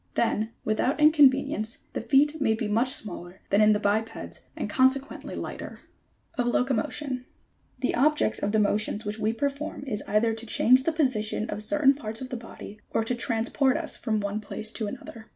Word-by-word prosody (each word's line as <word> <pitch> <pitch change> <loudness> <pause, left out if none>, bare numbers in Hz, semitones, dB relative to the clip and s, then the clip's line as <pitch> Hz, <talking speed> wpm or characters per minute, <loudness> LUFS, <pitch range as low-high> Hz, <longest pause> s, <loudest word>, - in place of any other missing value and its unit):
Then, 220 -1 +1 0.2
without 220 +7 0
inconvenience 275 -6 +4
the - - -3
feet 285 +6 +2
may 220 -5 +3
be 220 -1 -3
much 235 +5 +1
smaller 185 - -8
than 200 +2 +4
in 215 0 +6
the 210 - 0
bipeds 220 +2 -2 0.2
and - - -3
consequently 265 +2 0
lighter. - - -7 0.6
OP 245 - +2
LOCOMOTION. 260 +3 0
85. 250 0 -6 0.6
The 255 - +1
objects 295 -3 +2
of 200 - -1
the 220 - +2
motions 210 +1 +1
which 210 +1 -4
we 215 0 +1
perform 275 +3 -3
is 210 -6 -3
either 220 +2 +2
to 225 +1 -7
change 255 +4 +4
the 330 - +2
position 240 -8 0
of 210 - -3
certain 280 +4 +4
parts 225 -5 -5
of 260 - -6
the 255 - -4
body, 225 -3 -10
or 225 - 0
to 225 - -1
transport 240 +4 +1
us 320 -2 -4
from 220 -3 -1
one 205 +1 -2
place 215 +1 -3
to 220 - -3
another. 225 0 -9
230 Hz, 190 wpm, -26 LUFS, 215-270 Hz, 0.6 s, in